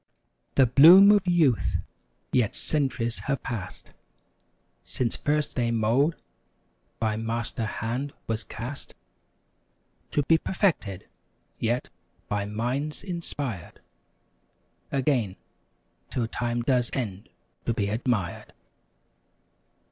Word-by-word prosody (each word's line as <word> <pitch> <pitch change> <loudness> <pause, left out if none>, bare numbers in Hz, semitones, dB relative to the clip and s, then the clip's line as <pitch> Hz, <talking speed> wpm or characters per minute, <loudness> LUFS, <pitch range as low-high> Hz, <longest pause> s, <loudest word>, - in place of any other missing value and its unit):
The 135 - +6
bloom 170 - +9
of 205 -3 +3
youth! 160 -10 +3 0.5
yet, 120 -5 +2
centuries 130 -6 -1
have 140 - 0
passed 100 -6 -6 0.9
Since 120 -3 -1
first 150 0 -1
thy 120 -2 +1
mold 115 +8 +2 0.8
by 110 -1 0
Master 115 0 -2
hand 120 +7 -3
was 115 0 -2
cast, 125 +5 -8 1.1
To 145 - +1
be 160 +3 +4
perfected, 155 - -1 0.5
yet, 120 +2 -1 0.4
by 105 -1 -1
minds 125 +8 -3
inspired— 145 - -5 1.1
Again, 130 -8 +1 0.7
'till 120 -3 -1
time 120 0 -2
does 125 -2 +2
end 105 -6 -4 0.4
to 115 - +2
be 100 -3 0
admired. 110 -4 -2
120 Hz, 95 wpm, -26 LUFS, 115-145 Hz, 1.1 s, bloom